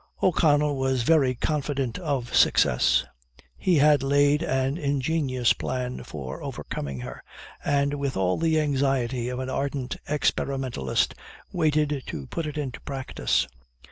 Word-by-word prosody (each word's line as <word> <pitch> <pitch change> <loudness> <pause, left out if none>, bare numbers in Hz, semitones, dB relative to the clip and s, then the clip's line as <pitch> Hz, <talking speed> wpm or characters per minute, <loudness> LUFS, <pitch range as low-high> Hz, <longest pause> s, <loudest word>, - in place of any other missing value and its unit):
O'Connell 150 -5 +3
was 130 -2 +1
very 135 -3 +3
confident 140 -2 -2
of 140 -8 -2
success. 60 - +4 0.5
He 180 - +1
had 145 -1 +5
laid 145 +2 +3
an 135 -4 0
ingenious 140 -4 +1
plan 125 -1 -4
for 65 -4 -7
overcoming 70 -3 -5
her, 60 0 -8 0.4
and, 140 0 +1
with 140 -4 -2
all 95 -1 +1
the 160 -1 +2
anxiety 135 -4 0
of 125 - -4
an 130 0 -3
ardent 135 -1 -2
experimentalist, 135 - 0 0.4
waited 150 -4 +1
to 70 - -5
put 160 - -4
it 150 - -5
into 135 -5 -4
practice. 135 - -1
135 Hz, 130 wpm, -26 LUFS, 125-150 Hz, 0.5 s, had